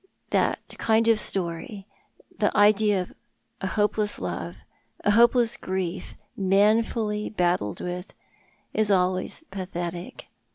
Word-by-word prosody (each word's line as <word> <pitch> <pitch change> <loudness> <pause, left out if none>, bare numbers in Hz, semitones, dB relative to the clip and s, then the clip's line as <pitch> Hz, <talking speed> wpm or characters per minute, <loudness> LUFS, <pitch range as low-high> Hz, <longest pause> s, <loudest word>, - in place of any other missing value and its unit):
"That - - +2 0.2
kind 225 0 +2
of 225 -2 +4
story 190 +1 -1 0.3
— - - -29
the 210 - +3
idea 205 -1 +4
of - - -15 0.5
a 190 - -1
hopeless 210 +1 0
love, 85 -1 -5 0.5
a 205 - +3
hopeless 235 +1 +4
grief, 185 -1 -4 0.2
manfully 210 +2 +1
battled 175 - 0
with— 180 +1 -6 0.6
is 215 -1 +2
always 185 - 0
pathetic. 175 -2 -6
195 Hz, 115 wpm, -25 LUFS, 180-215 Hz, 0.6 s, of